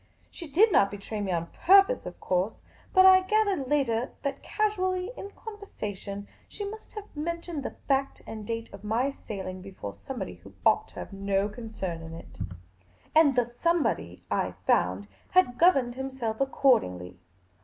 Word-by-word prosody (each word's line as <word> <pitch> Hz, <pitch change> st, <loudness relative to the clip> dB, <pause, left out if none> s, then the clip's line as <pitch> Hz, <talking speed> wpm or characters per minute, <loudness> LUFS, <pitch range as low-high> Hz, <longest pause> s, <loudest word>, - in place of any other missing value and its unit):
She 340 Hz, -, -8 dB
did 395 Hz, +10 st, +5 dB
not 200 Hz, -, +5 dB
betray 205 Hz, +1 st, -5 dB
me 195 Hz, -2 st, -1 dB
on 170 Hz, -1 st, -1 dB
purpose, 395 Hz, +7 st, +6 dB
of -, -, -8 dB
course; 185 Hz, +4 st, -1 dB, 0.3 s
but 375 Hz, -1 st, +7 dB
I 375 Hz, 0 st, +9 dB
gathered 395 Hz, -7 st, +1 dB
later 255 Hz, -5 st, +1 dB
that 280 Hz, -1 st, -2 dB
casually 375 Hz, -2 st, 0 dB
in 400 Hz, -, -7 dB
conversation 210 Hz, -, -7 dB, 0.2 s
she 410 Hz, -, -5 dB
must 435 Hz, +2 st, -9 dB
have 420 Hz, -5 st, -9 dB
mentioned 335 Hz, 0 st, -3 dB
the -, -, -5 dB
fact 275 Hz, 0 st, 0 dB
and 220 Hz, -1 st, -7 dB
date 230 Hz, +1 st, -4 dB
of 200 Hz, 0 st, -10 dB
my 235 Hz, +6 st, +1 dB
sailing 190 Hz, -7 st, -6 dB
be 195 Hz, -, -9 dB
fore 100 Hz, -, -7 dB
somebody 95 Hz, -1 st, -6 dB
who -, -, -15 dB
ought -, -, +4 dB
to -, -, -22 dB
have -, -, -7 dB
had 195 Hz, -, -9 dB
no 200 Hz, 0 st, +2 dB
concern 210 Hz, -7 st, -5 dB
in 165 Hz, 0 st, -8 dB
it; 165 Hz, -, -12 dB, 0.7 s
and 310 Hz, -4 st, +6 dB
the 245 Hz, -1 st, +3 dB, 0.2 s
somebody, 335 Hz, -, +1 dB
I -, -, 0 dB
found, 95 Hz, +3 st, +2 dB, 0.2 s
had 340 Hz, -10 st, +3 dB
governed 270 Hz, -9 st, +5 dB
himself 260 Hz, -3 st, -3 dB
accordingly. 90 Hz, -, +2 dB
255 Hz, 165 wpm, -28 LUFS, -, 0.7 s, I